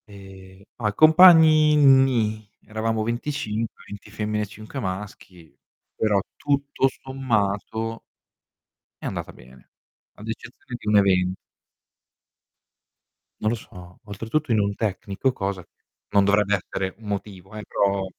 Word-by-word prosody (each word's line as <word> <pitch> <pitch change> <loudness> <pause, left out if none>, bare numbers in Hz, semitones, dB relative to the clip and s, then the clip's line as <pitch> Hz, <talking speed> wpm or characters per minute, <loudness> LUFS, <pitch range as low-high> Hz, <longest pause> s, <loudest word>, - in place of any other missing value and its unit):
E 95 -1 -14
a 115 - -1
i - - -5
compagni 155 -2 +7
nì, 130 -7 +3 0.2
eravamo 110 0 -2
25, 115 -2 -3
20 105 0 -10
femmine 105 0 -2
e - - -3
5 110 +6 -9
maschi, 95 - -7 0.4
però 105 -2 +2 0.2
tutto 140 -1 0
sommato 115 -3 -2 1.0
è - - -2
andata - - -5
bene, 65 +1 -18 0.5
ad 105 - -10
eccezione 120 +2 -8
di - - -12
un 105 0 +4
evento. 95 -2 +3 2.1
Non 110 - +1
lo 115 - 0
so, 90 -5 -13
oltretutto 115 +8 -3
in 110 - +3
un 100 0 0
tecnico, 105 +3 -2
cosa 95 -5 -4
che - - -34 0.4
non 100 -1 +4
dovrebbe 105 0 +2
essere 95 -1 -4
un 110 - -12
motivo, 100 -1 -6
eh, 105 - -6
però 100 -1 0
105 Hz, 130 wpm, -23 LUFS, 100-120 Hz, 2.1 s, compagni